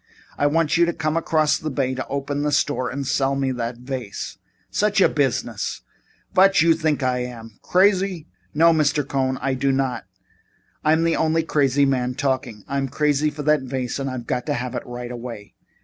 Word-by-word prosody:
I 145 Hz, -, +2 dB
want 160 Hz, +1 st, +2 dB
you 170 Hz, 0 st, +4 dB
to 170 Hz, -, 0 dB
come 155 Hz, +3 st, -1 dB
across 155 Hz, -2 st, +2 dB
the 155 Hz, -, -3 dB
bay 135 Hz, -2 st, -1 dB
and 130 Hz, 0 st, -3 dB
open 140 Hz, +1 st, -2 dB
the 150 Hz, 0 st, 0 dB
store 140 Hz, -2 st, +1 dB
and 140 Hz, +1 st, -4 dB
sell 135 Hz, +1 st, +1 dB
me 135 Hz, -1 st, 0 dB
that 120 Hz, -1 st, -3 dB
vase." 125 Hz, -4 st, -6 dB, 0.3 s
"Such 210 Hz, 0 st, +1 dB
a 190 Hz, -, +6 dB
business! 120 Hz, -7 st, -1 dB, 0.5 s
Vot 195 Hz, +1 st, +5 dB
you 165 Hz, 0 st, +5 dB
think 155 Hz, -3 st, 0 dB
I 125 Hz, -1 st, +1 dB
am? 115 Hz, -3 st, -7 dB
Crazy?" 190 Hz, -3 st, +2 dB, 0.3 s
"No, 165 Hz, +2 st, +5 dB
Mr. 145 Hz, -2 st, +1 dB
Cohn, 130 Hz, -2 st, 0 dB
I 135 Hz, -, +1 dB
do 135 Hz, +1 st, +1 dB
not. 130 Hz, -3 st, -1 dB, 0.8 s
I'm 160 Hz, +2 st, +3 dB
the 165 Hz, 0 st, +2 dB
only 160 Hz, 0 st, +2 dB
crazy 140 Hz, -3 st, +2 dB
man 125 Hz, -2 st, 0 dB
talking. 130 Hz, -6 st, -2 dB
I'm 140 Hz, -1 st, -1 dB
crazy 150 Hz, +1 st, +1 dB
for 150 Hz, 0 st, -7 dB
that 150 Hz, -1 st, +3 dB
vase 130 Hz, -1 st, -3 dB
and 135 Hz, 0 st, -2 dB
I've 125 Hz, -2 st, -5 dB
got 125 Hz, +3 st, -2 dB
to 145 Hz, -, 0 dB
have 125 Hz, +1 st, -4 dB
it -, -, -2 dB
right 120 Hz, 0 st, -6 dB
away." 115 Hz, -4 st, -8 dB
140 Hz, 195 wpm, -22 LUFS, 125-155 Hz, 0.8 s, a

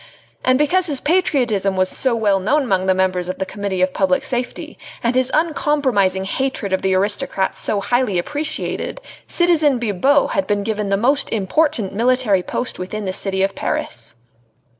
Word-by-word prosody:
And 255 Hz, 0 st, +3 dB
because 355 Hz, +6 st, +3 dB
his 285 Hz, -4 st, +1 dB
patriotism 250 Hz, -, +1 dB
was 185 Hz, 0 st, +2 dB
so 255 Hz, +5 st, +1 dB
well 205 Hz, -4 st, +2 dB
known 285 Hz, +10 st, +1 dB
among 190 Hz, -6 st, 0 dB
the 190 Hz, -, +3 dB
members 185 Hz, -1 st, 0 dB
of 185 Hz, -, -4 dB
the 190 Hz, -, -2 dB
Committee 195 Hz, -1 st, -2 dB
of 185 Hz, 0 st, 0 dB
Public 185 Hz, -2 st, +1 dB
Safety, 245 Hz, -1 st, -4 dB, 0.2 s
and 235 Hz, +1 st, +1 dB
his 255 Hz, 0 st, +2 dB
uncompromising 265 Hz, -, +1 dB
hatred 225 Hz, -3 st, -2 dB
of 190 Hz, -, +1 dB
the 190 Hz, -1 st, +1 dB
aristocrats 195 Hz, 0 st, -1 dB
so 205 Hz, -, -1 dB
highly 240 Hz, -3 st, 0 dB
appreciated, 300 Hz, -, -3 dB, 0.3 s
citizen 320 Hz, -6 st, +3 dB
Bibot 240 Hz, +6 st, +2 dB
had 290 Hz, -, -1 dB
been 205 Hz, -1 st, 0 dB
given 210 Hz, -1 st, -2 dB
the 195 Hz, -, +2 dB
most 270 Hz, +7 st, +1 dB
important 225 Hz, +1 st, 0 dB
military 235 Hz, -3 st, +2 dB
post 250 Hz, +7 st, -4 dB
within 205 Hz, +3 st, -5 dB
the 185 Hz, -, -2 dB
city 190 Hz, 0 st, -1 dB
of 195 Hz, -, 0 dB
Paris. -, -, -3 dB
215 Hz, 170 wpm, -19 LUFS, 190-270 Hz, 0.3 s, And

